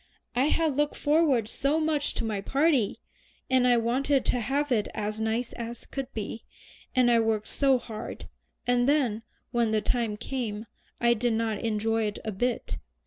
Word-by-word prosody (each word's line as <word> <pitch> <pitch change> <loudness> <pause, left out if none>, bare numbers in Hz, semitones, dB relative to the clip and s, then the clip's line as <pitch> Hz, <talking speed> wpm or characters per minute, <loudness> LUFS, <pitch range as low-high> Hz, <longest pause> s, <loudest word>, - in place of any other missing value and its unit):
"I 255 +3 +3
had 310 -1 +2
looked 295 +1 +1
forward 290 -7 +3
so 280 +7 0
much 310 -2 0
to - - -1
my 210 -3 -2
party, 275 -1 +2 0.5
and 255 -1 +4
I 245 -1 +5
wanted 265 +4 +1
to 250 - +1
have 275 +5 -1
it 215 -4 +2
as 215 0 -2
nice 225 +2 -1
as 235 0 -6
could 270 -1 -5
be, 220 +1 -5 0.5
and 250 -1 +5
I 235 - +5
worked 220 -1 +1
so 270 +2 +3
hard; 225 -2 -7 0.4
and 245 +1 +3
then, 250 -7 +2 0.3
when 235 -2 +2
the 215 -1 +1
time 220 0 0
came, 230 -3 -4 0.3
I 235 0 +4
didn't 230 0 0 0.2
enjoy 225 0 0
it 210 - -4
a 220 - -1
bit. 245 +5 -2
240 Hz, 170 wpm, -28 LUFS, 220-270 Hz, 0.5 s, I